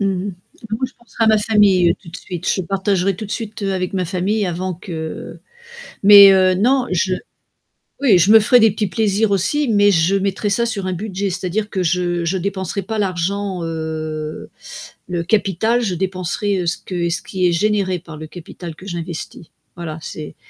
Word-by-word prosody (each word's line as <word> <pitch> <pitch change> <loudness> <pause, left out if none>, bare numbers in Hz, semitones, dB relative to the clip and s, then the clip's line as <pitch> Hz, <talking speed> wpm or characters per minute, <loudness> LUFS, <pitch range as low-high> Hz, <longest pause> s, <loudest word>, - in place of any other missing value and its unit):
Mmh 200 - +1 0.2
mh. 190 - -6 0.3
Bah 220 -1 -4
moi 260 - 0
je 260 - -15
penserais 235 -1 -3
à - - +2
ma 220 -1 +5
famille, 205 -5 +4
heu, - - +2
tout 180 - -15
de 165 - -8
suite, 180 -1 -6
je 190 - -1
partagerais 195 +1 0
tout 210 +4 -7
de - - -13
suite, 220 -2 -5
heu, 195 -1 0
avec 185 0 -2
ma 185 -2 -1
famille 190 +4 -1
avant 180 +1 -3
que 165 -3 -7 0.7
mais 200 0 +10
heu, 185 -1 +4
non 250 +6 +2
je 185 +1 +1 0.9
oui 235 -10 +5
je 180 +4 +3
me 225 - +9
ferais 245 +4 +5
des 225 0 +6
petits 210 +1 -2
plaisirs 215 +1 +1
aussi, 225 +10 +1
mais 205 -2 +4
je 175 +1 +2
mettrais 195 +1 -1
ça 235 +4 +1
sur 200 -5 -3
un 185 - -2
budget, 200 +1 -3
c'est-à-dire 190 +3 -2
que 190 - -1
je 175 0 0
je 180 +3 0
dépenserais 190 +1 -3
pas 220 +4 -4
l'argent, 190 0 -2
heu, 155 -1 -5 0.6
le 175 -1 -2
capital 220 +4 +1
je 195 -6 -1
dépenserais, 190 +2 -2
heu, - - -3
ce 170 - 0
que 175 -2 -3
ce 170 - -2
qui 185 -2 -1
est - - +2
généré 190 0 0
par 160 -2 -11
le 155 - -7
capital 170 0 -9
que 185 - -14
j'investis. 170 -1 -6 0.3
Voilà, 165 -3 -6
c'est 155 -1 -8
190 Hz, 200 wpm, -19 LUFS, 175-205 Hz, 0.9 s, mais